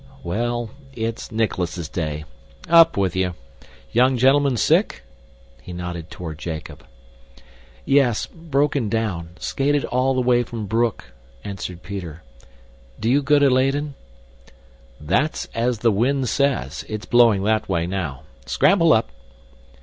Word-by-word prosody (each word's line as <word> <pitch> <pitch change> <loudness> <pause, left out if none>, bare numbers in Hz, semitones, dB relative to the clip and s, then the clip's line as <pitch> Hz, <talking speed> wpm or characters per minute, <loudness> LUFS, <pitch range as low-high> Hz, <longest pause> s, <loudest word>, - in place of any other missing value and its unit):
"Well, 120 +4 -2 0.2
it's 115 -1 -4
Nicholas's 95 -7 -2
Day 75 -2 -4 0.4
up 165 -4 +6
with 95 -3 0
you! 90 -2 0 0.6
Young 125 +2 +3
gentleman 135 +1 +3
sick?" - - +2 0.6
He 90 - -9
nodded 90 -1 -6
toward 80 -4 -7
Jacob. 80 -1 -7 1.0
"Yes 135 -5 +3
broken 145 - -1
down. 100 -7 -2
Skated 145 +6 0
all 130 +2 +1
the 130 - +1
way 125 -1 +3
from 115 -2 -5
Broek," 110 - -1 0.3
answered 90 -3 -6
Peter. 90 -5 -7 0.8
"Do 115 +2 0
you 140 +2 +4
go 145 +1 +3
to 145 -1 +5
Leyden?" 135 +3 +1 1.1
"That's 130 - 0
as 120 +1 0
the 115 - +6
wind 125 +5 +1
says. 130 - 0
It's 110 0 -5
blowing 115 -5 +4
that 110 0 0
way 85 -3 0
now. 85 -7 -4 0.2
Scramble 165 +3 +4
up!" 110 - +1
115 Hz, 125 wpm, -22 LUFS, 90-135 Hz, 1.1 s, up